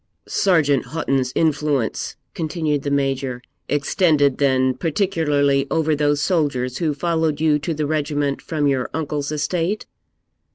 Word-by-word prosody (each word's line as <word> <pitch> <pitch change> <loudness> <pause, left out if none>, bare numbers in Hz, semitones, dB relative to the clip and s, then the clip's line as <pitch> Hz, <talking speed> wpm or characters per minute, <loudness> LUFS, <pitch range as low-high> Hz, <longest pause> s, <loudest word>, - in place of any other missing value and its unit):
'Sergeant 150 -8 +2
Houghton's 135 -5 -1
influence,' 150 -6 0 0.2
continued 155 -3 -1
the 140 - -3
Major, 135 -2 -1 0.3
'extended, 145 -1 +2
then, 130 -2 +3
particularly 145 -3 +1
over 160 -1 +1
those 145 0 +1
soldiers 140 -7 0
who 155 -4 0
followed 160 -1 0
you 155 -1 +3
to 165 - -3
the 155 -1 -1
regiment 145 -2 -1
from 155 -2 -2
your 135 -3 +1
uncle's 150 -2 -2
estate?' 170 +6 -1
145 Hz, 125 wpm, -21 LUFS, 140-160 Hz, 0.3 s, then